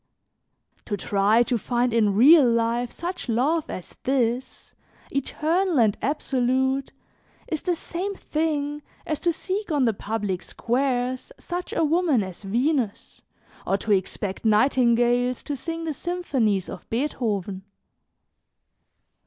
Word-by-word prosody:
"To 205 - -2
try 205 +4 +3
to 240 -1 -1
find 240 +2 0
in 210 -4 +3
real 275 +4 +7
life 235 +1 +1
such 350 -5 -5
love 285 +8 +1
as 185 - -8
this, 250 -1 -1 0.4
eternal 320 +4 0
and 215 -3 +4
absolute, 265 -1 0 0.6
is 315 -3 -2
the 355 -2 0
same 370 +4 -4
thing 295 -3 -2 0.2
as 310 - -2
to 345 - +2
seek 380 +3 -3
on 285 -4 +2
the 225 - +2
public 205 -3 -3
squares 250 +2 -1
such 355 +1 -5
a - - +1
woman 315 - +2
as 185 -2 -8
Venus 235 +2 -1 0.5
or 195 - +2
to 215 - -3
expect 190 0 -1
nightingales 245 +1 +3
to 290 - -3
sing 330 +4 -5
the 320 -2 -2
symphonies 265 - -1
of - - -9
Beethoven. 215 -7 -2
255 Hz, 125 wpm, -24 LUFS, 225-310 Hz, 0.6 s, real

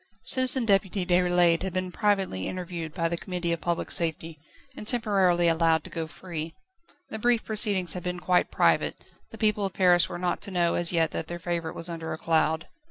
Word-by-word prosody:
Citizen 255 -1 +2
Deputy 195 -2 +1
Déroulède 175 -1 +3
had 190 -1 -4
been 185 -1 -2
privately 195 - 0
interviewed 175 -3 -5
by 165 0 -1
the 170 0 -2
Committee 180 -1 -3
of 170 - -2
Public 170 -1 -2
Safety, 160 -1 -2 0.4
and 215 - -9
temporarily 195 -8 +3
allowed 165 -1 +2
to - - -11
go 165 -1 -4
free. 160 -1 -7 0.6
The 220 - -4
brief 240 0 +2
proceedings 205 -4 +2
had 180 - -5
been 180 0 -4
quite 180 0 +1
private, - - +2 0.3
the - - -11
people 210 -2 +1
of 195 - -2
Paris 180 -2 +4
were - - -5
not 180 0 -2
to 200 - -6
know 175 -3 +1
as 175 -1 +1
yet 165 -2 +1
that 160 - -4
their 175 - -5
favourite 170 -2 -4
was 165 - -1
under 165 -2 -5
a - - -5
cloud. 160 0 0
175 Hz, 200 wpm, -26 LUFS, 165-195 Hz, 0.6 s, Paris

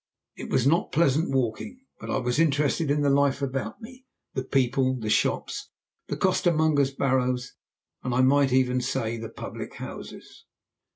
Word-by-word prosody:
It - - -8
was 125 - +1
not 160 +5 +2
pleasant 160 0 +2
walking, 135 - -2 0.2
but - - -8
I - - 0
was 125 +1 -1
interested 150 0 +2
in 145 +1 +2
the 145 - +3
life 140 0 +2
about 135 - -4
me 255 +3 -12 0.3
the 130 - -2
people, 130 0 +1
the 110 -1 -2
shops, - - 0 0.4
the - - -3
costermongers' 155 -5 +2
barrows, 125 -2 0 0.5
and 125 - -3
I 125 +1 +2
might 135 +1 +4
even 125 -1 +2
say 115 -2 -2
the 115 -1 -6
public - - -8
houses. - - -10
135 Hz, 160 wpm, -26 LUFS, 125-145 Hz, 0.5 s, might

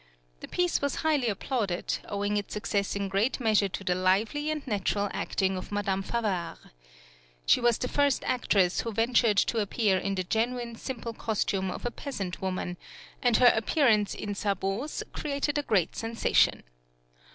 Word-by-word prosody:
The - - -8
piece 355 -1 0
was 285 -1 0
highly 295 -6 +2
applauded, 205 -3 -2
owing 205 0 -1
its 205 -1 -3
success 205 -2 -1
in 200 0 -1
great 200 +8 0
measure 215 -4 +3
to 195 - -6
the 180 - +1
lively 200 +11 +1
and 305 -2 -3
natural 205 -3 -1
acting 190 -1 0
of 185 - -6
Madame 200 -2 0
Favart. 195 -6 -2 0.9
She - - +4
was 240 -1 +3
the 250 - -2
first 285 +1 +1
actress 195 -7 +2
who 230 - -4
ventured 230 -1 +3
to 230 - +2
appear 205 -2 +1
in 195 +1 -2
the 185 - -1
genuine 235 +4 -1
simple 235 -1 -5
costume 200 -4 -1
of 185 - -6
a 240 - -1
peasant 195 -10 -5
woman, 185 -1 -3 0.4
and 245 -3 +4
her 245 -1 +7
appearance 220 -3 +2
in 205 - -4
sabots 200 +7 -2
created 290 0 -1
a - - +1
great 200 - +1
sensation. 230 0 +2
210 Hz, 165 wpm, -28 LUFS, 195-245 Hz, 0.9 s, her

